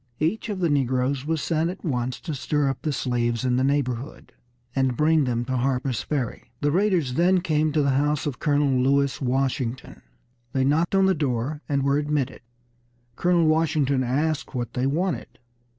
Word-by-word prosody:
Each 190 +9 -1
of 200 -3 -3
the 170 - +2
negroes 130 0 0
was 160 -2 -1
sent 165 0 0
at 185 - -8
once 125 -4 -2
to 160 - -4
stir 140 +2 0
up 135 - -4
the 155 - -1
slaves 120 -2 -1
in 125 -1 +2
the 130 - +2
neighborhood, 135 -2 -2 0.4
and 130 -3 +1
bring 155 -1 +3
them 120 -1 -1
to 130 +1 -1
Harper's 130 -1 0
Ferry. 135 -7 -3
The 145 0 +2
raiders 180 -7 +1
then 180 +4 +3
came 155 -3 +1
to 155 -2 +2
the 140 - +2
house 145 +2 +1
of 145 -4 -3
Colonel 145 -4 +2
Lewis 140 +1 +1
Washington. 130 -1 -2 0.5
They 130 - +1
knocked 160 +7 +2
on 195 0 +4
the 190 - +4
door, 145 -1 -2
and 140 -2 +1
were 140 +1 +2
admitted. 145 -3 -2 0.7
Colonel 175 +1 +2
Washington 155 -4 +2
asked 145 +4 -1
what 120 -2 -3
they 125 +1 0
wanted. 175 +6 -2
140 Hz, 180 wpm, -24 LUFS, 130-155 Hz, 0.7 s, on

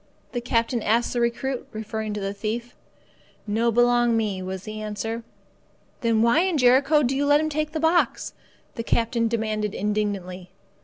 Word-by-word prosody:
the 240 - -3
captain 235 0 0
asked 230 +3 +1
the 240 - 0
recruit, 245 +2 -1
referring 220 0 -4
to 210 - -3
the 195 0 -3
thief. 225 +4 -4 0.7
"No 225 +3 +1
belong 240 0 +3
me," 205 -4 -1
was 185 0 -5
the 215 +1 -6
answer. 215 +2 -4 0.8
"Then 230 -2 +2
why 235 +7 +4
in 365 -2 +1
Jericho 275 +4 +4
do 260 +1 0
you 280 - +1
let 290 +1 +5
him 310 0 0
take 305 0 -2
the 315 - -3
box?" 325 +2 +1 0.4
the 230 - -4
captain 230 0 +1
demanded 215 -2 -2
indignantly. 195 -3 -2
230 Hz, 165 wpm, -24 LUFS, 215-245 Hz, 0.8 s, let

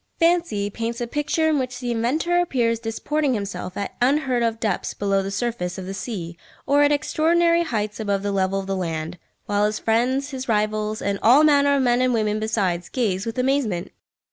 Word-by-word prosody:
Fancy 330 - +1
paints 230 +2 -4
a 240 - -1
picture 295 +5 0
in 310 -2 +2
which 250 -1 -4
the 245 -1 -3
inventor 295 +10 +1
appears 235 -9 0
disporting 260 +5 -1
himself 200 -3 -5
at 200 - -4
unheard 260 -1 +2
of 230 -1 0
depths 215 -5 -2
below 195 -1 +1
the 195 - -4
surface 195 -4 -3
of 190 - -6
the 190 - -5
sea 175 -6 -6 0.3
or 285 +1 +3
at 290 0 +4
extraordinary 335 +3 +2
heights 215 -9 -2
above 200 -2 -1
the 205 - -1
level 195 0 0
of 195 - -5
the 195 0 -2
land, 165 -1 -4 0.3
while 205 0 +1
his 215 0 -2
friends, 255 +5 0
his 265 -1 -6
rivals, 215 0 0
and 200 0 -1
all 255 +7 +6
manner 285 -2 +4
of 275 - +2
men 245 0 +3
and 255 -1 +2
women 215 -1 0
besides, 190 -6 -1
gaze 210 -5 -1
with 230 +2 -4
amazement! 250 -9 0
230 Hz, 195 wpm, -23 LUFS, 200-275 Hz, 0.3 s, all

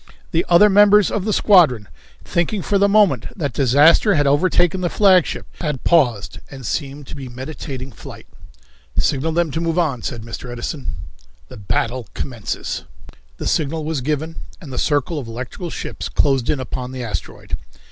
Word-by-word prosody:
The 165 - +2
other 175 +4 +7
members 205 0 +5
of 205 -2 -2
the 215 - 0
squadron, 160 - +4 0.4
thinking 175 +3 -1
for 200 -1 +1
the 200 +1 +4
moment 205 -2 +3
that 145 -8 -2
disaster 145 - +5
had 145 -2 +2
overtaken 175 +5 +2
the 175 - 0
flagship, 190 -4 +3
had 150 -6 -3
paused 125 -12 +2
and 135 -3 -10
seemed 140 +2 -4
to - - -9
be 135 -3 -7
meditating 130 +1 -7
flight. - - -11 0.7
"Signal 150 +3 +1
them 170 -2 +1
to 160 - -2
move 165 0 -1
on," 145 -9 0
said 115 -1 -5
Mr. 115 +2 -7
Edison. 125 +4 -5 0.6
The - - -10
Battle 115 +3 -2
Commences. 115 -6 -4 0.5
The - - -6
signal 155 +1 -1
was 155 -3 -2
given, 155 +4 -2 0.2
and 145 -7 -10
the - - -2
circle 145 +1 0
of 130 - -7
electrical 125 - -6
ships - - -5
closed 135 -4 +1
in 145 - +1
upon 130 0 -5
the 130 -1 -5
asteroid. 115 - -5
150 Hz, 165 wpm, -20 LUFS, 130-175 Hz, 0.7 s, other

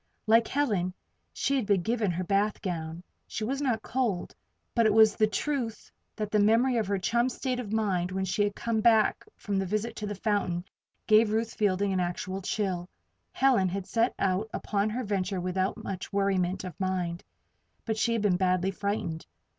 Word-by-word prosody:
Like 225 +1 +5
Helen, 205 -11 0 0.4
she 275 - 0
had 250 -7 0
been 195 -4 +2
given 225 -2 0
her 180 +1 -1
bath 200 +3 +1
gown. 165 -2 -4 0.2
She 220 - -4
was 270 +6 -2
not 235 -6 0
cold. 230 -8 -1 0.4
But 230 -2 +4
it 215 - +3
was 220 -1 +6 0.2
truth 255 -6 -2 0.2
that 210 -2 -4
the 210 - +3
memory 230 +5 +4
of 220 -4 0
her 200 0 0
chum's 235 +6 +1
state 255 -2 -2
of 220 -5 -5
mind 190 -5 0
when 190 0 -1
she 190 +3 -1
had 205 -1 -1
come 230 -2 -1
back 220 -1 +4
from 200 -2 -3
the 195 - -1
visit 215 +4 -2
to 210 - -4
the 205 - -4
fountain, 195 -4 -1 0.4
gave 215 0 +5
Ruth 225 +1 0
Fielding 200 -1 +1
an 185 - +1
actual 180 +2 -3
chill. 185 -3 -2 0.4
Helen 245 -8 +3
had 195 +1 -4
set 230 +4 +1
out 195 +3 0
upon 205 0 -1
her 245 +4 -3
venture 195 -2 -1
without 185 +2 -1
much 190 -2 -6
worriment 190 -2 0
of 180 -4 -8
mind; 180 -2 -2 0.6
but 220 - -1
she 230 +2 +1
had 225 -2 0
been 190 -4 +3
badly 185 0 +1
frightened. 195 -5 -3
205 Hz, 185 wpm, -28 LUFS, 185-225 Hz, 0.6 s, was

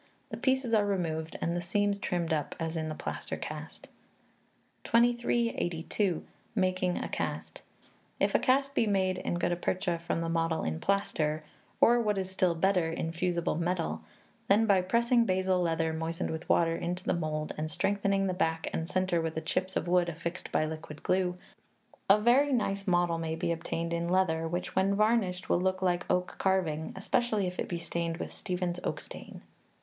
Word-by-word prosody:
The - - -4
pieces 260 -3 +1
are 215 -2 +5
removed, 165 -5 -2
and 170 - 0
the 175 - -1
seams 200 +3 0
trimmed 170 -4 -1
up, 150 -2 -2
as 165 0 -2
in 160 -1 -2
the 155 - -4
plaster - - -4
cast. - - -7 1.0
2382. 230 -7 +1 0.3
Making 185 -2 +1
a - - -3
Cast. - - -4 0.6
If - - +2
a - - +5
cast 275 +1 +2
be 230 - +2
made 190 -2 +1
in - - -2
Gutta 175 0 +1
Percha 180 0 -1
from 170 0 -2
the 165 - -2
model 165 -1 0
in 80 0 -2
plaster 155 -6 0 0.4
or, 240 +1 +6
what 210 -3 0
is 190 -1 -2
still 185 -2 +2
better, 180 -1 +2
in 165 0 -2
fusible 175 0 0
metal, 175 0 -1 0.5
then, 210 +3 +5
by 200 -4 +4
pressing 235 +5 +3
basil 185 -2 +1
leather, 165 -1 0
moistened 165 +1 -2
with 160 +1 -6
water, 165 -1 +3
into 180 +2 -3
the - - +1
mould, 155 -2 -2
and 155 +1 -3
strengthening 195 +3 +1
the 185 - 0
back 165 -3 -1
and 165 +1 -2
centre 185 -2 +1
with 160 -1 -3
chips 185 +2 -1
of - - -1
wood 175 0 +3
affixed 170 +2 -5
by 155 - +2
liquid 155 -1 -7
glue, 180 -1 +1 0.7
a 200 +2 +7
very 255 +6 +4
nice 200 -5 0
model 175 -2 +2
may 160 -1 -2
be 170 +1 -1
obtained 165 0 -2
in 170 0 -1
leather, 165 -3 +2
which, 175 +2 -3
when 195 +1 +3
varnished, 215 -4 +1
will 175 - +2
look 185 0 0
like 175 -1 0
oak 180 0 0
carving 170 -5 0
especially 215 +1 +1
if 180 0 -4
it - - -2
be 175 - -2
stained 170 0 -3
with - - -5
Stephens's 180 -1 -3
Oak - - -2
Stain. - - -10
180 Hz, 180 wpm, -30 LUFS, 165-195 Hz, 1.0 s, a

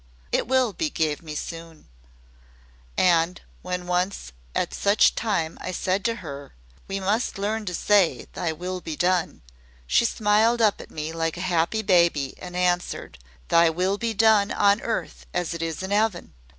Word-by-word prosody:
It - - 0
will 255 -3 +2
be 315 - -1
gave 155 - -1
me 155 -2 -8
soon,' 165 0 -7 1.1
and 175 0 +3 0.2
when 180 0 -4
once 180 - -1 0.2
at - - -1
such 200 +1 +4
a - - -13
time 185 -8 -2
I - - -4
said 185 +2 -1
to 230 - +1
her, 140 -2 -8 0.3
'We 195 0 -3
must 210 +5 0
learn 210 +2 -2
to 180 -2 -3
say, 185 - +2
Thy 170 - -2
will 180 +3 -5
be 160 -2 -5
done,' 175 - 0 0.4
she 235 - +3
smiled 220 +2 +2
up 215 -3 +3
at - - -12
me 155 +1 -5
like 165 0 -2
a - - -5
happy 180 +4 0
baby 170 -8 +3
and 180 -1 -8
answered: 180 - -1 0.3
"'Thy 170 0 +5
will 185 +5 0
be 230 -1 -2
done 210 -1 +4
on 205 +1 +3
earth 230 - -4
AS 175 -1 -1
IT 170 - -5
IS 165 +2 -3
IN 190 - -5
'EAVEN. 205 - 0
180 Hz, 175 wpm, -24 LUFS, 165-205 Hz, 1.1 s, Thy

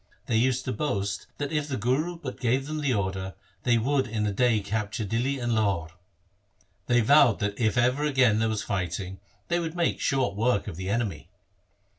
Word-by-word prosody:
They 115 - +1
used 130 +2 +1
to 130 - -2
boast 100 -9 -2
that 145 0 -3
if 150 -2 -1
the 135 -3 -2
Guru 145 +10 0
but 140 -6 -7
gave 130 +3 +1
them 155 +1 -4
the 145 -3 +1
order, 95 -3 -2 0.3
they 120 +1 +3
would 135 +3 +1
in 110 -2 -1
a 105 - 0
day 115 +2 +2
capture 105 +2 -3
Dihli 120 +7 0
and 120 -1 -1
Lahore. 100 -7 0 1.0
They 120 0 +4
vowed 135 -1 +5
that 100 0 -2
if 110 -2 +1
ever 125 +4 +2
again 130 -7 +3
there 110 0 +1
was 110 -2 -2
fighting 95 0 -3 0.3
they 175 0 +1
would 165 -1 -4
make 170 -1 0
short 130 -8 +1
work 110 -1 +1
of - - -5
the 95 +2 -5
enemy. 100 -9 -2
115 Hz, 195 wpm, -27 LUFS, 100-135 Hz, 1.0 s, vowed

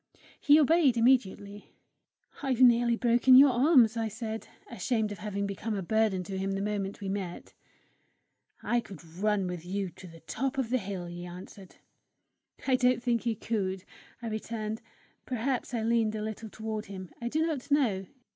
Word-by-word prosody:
He 295 +1 +6
obeyed 305 -4 +4
immediately. 210 -4 +1 0.7
"I've 265 -4 -1
nearly 240 -1 +5
broken 240 +2 +5
your 275 0 +8
arms," 245 -3 +5
I 225 -1 -1
said, 220 0 -5 0.2
ashamed 230 -3 -1
of 205 - -7
having 205 -1 -3
become 200 +2 -3
a 195 - -3
burden 215 -1 +1
to 190 +2 -5
him 195 0 -1
the 195 - -2
moment 205 -1 -3
we 200 - -4
met. 190 -3 -5 1.1
"I 240 - +1
could 190 -7 -10
run 195 +4 -1
with 180 -2 -5
you 190 +1 -3
to 185 - -13
the 165 -1 -14
top 265 +10 -3
of 250 -3 -1
the 255 - +2
hill!" 190 -3 -5
he 175 0 -7
answered. 185 +1 -11 0.9
"I 260 -2 +3
don't 250 -1 +2
think 240 -1 0
you 230 - +1
could," 195 -4 -2 0.4
I - - -3
returned. 220 0 -4 0.5
Perhaps 255 +1 -2
I 235 -3 -2
leaned 225 -1 +1
a 210 - -3
little 220 +1 -6
toward 220 0 -5
him; 190 -2 -8
I 235 - -2
do 315 +5 +1
not 290 -4 -3
know. 225 -10 +1
220 Hz, 175 wpm, -29 LUFS, 195-245 Hz, 1.1 s, your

